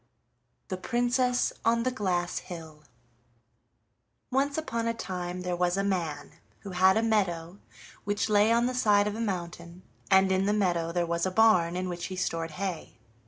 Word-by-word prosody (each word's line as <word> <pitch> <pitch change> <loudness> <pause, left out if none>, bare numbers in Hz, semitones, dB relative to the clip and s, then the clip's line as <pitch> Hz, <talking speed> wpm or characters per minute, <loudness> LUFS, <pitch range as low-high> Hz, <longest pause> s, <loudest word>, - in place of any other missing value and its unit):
THE 185 - -3
PRINCESS 245 +3 +1
ON 230 +1 +2
THE 255 - 0
GLASS 180 -7 -1
HILL 160 -3 -10 1.5
Once 280 +3 +1
upon 230 -7 -2
a 230 - -1
time 180 -3 -5
there 180 -1 -2
was 175 +1 0
a 195 - +1
man 170 -7 -2 0.3
who 200 - -8
had 185 +2 +4
a 225 - +1
meadow 190 -5 0 0.4
which 205 +1 -1
lay 210 +1 +4
on 235 +1 +3
the 255 - -1
side 210 -5 +3
of 210 - -2
a 225 - -4
mountain, 175 -3 -5 0.3
and 190 -1 +5
in 190 +1 +1
the 205 - +2
meadow 175 -5 0
there 175 0 0
was 170 +1 -1
a - - 0
barn 185 -4 +4
in 185 0 -2
which 175 -1 -4
he 185 - -6
stored 165 -3 -2
hay. 185 -8 -5
190 Hz, 175 wpm, -28 LUFS, 175-220 Hz, 1.5 s, and